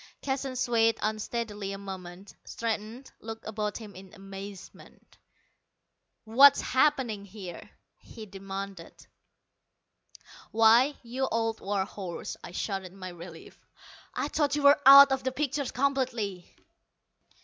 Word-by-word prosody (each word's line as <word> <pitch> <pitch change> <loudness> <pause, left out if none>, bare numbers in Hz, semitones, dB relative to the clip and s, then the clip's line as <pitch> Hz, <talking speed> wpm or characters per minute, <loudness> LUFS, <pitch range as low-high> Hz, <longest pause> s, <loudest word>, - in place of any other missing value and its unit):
Keston 270 -1 -3
swayed 230 -2 +2
unsteadily 215 -1 -3
a - - -5
moment, 190 -1 -9
straightened, 230 +3 -5
looked 225 0 -8
about 210 -1 -3
him 215 -3 -10
in 190 +2 -13
amazement. 195 -1 -12 1.0
"What's 270 +6 +7
happening 255 -6 +1
here?" 190 -3 -10 0.3
he 220 -2 -11
demanded. 195 -2 -8 1.5
"Why, 230 +6 +5
you 255 +3 -2
old 225 -1 -1
war 195 -1 -1
horse," 190 -4 -7
I - - -8
shouted 190 0 -4
in - - -16
my 185 -1 -7
relief, 170 -1 -12 0.6
"I - - -1
thought 295 -1 0
you 295 - -2
were 285 +1 +6
out 275 0 +10
of 265 -1 0
the 260 - -1
picture 280 +1 -2
completely!" 245 -9 -2
220 Hz, 120 wpm, -28 LUFS, 195-260 Hz, 1.5 s, out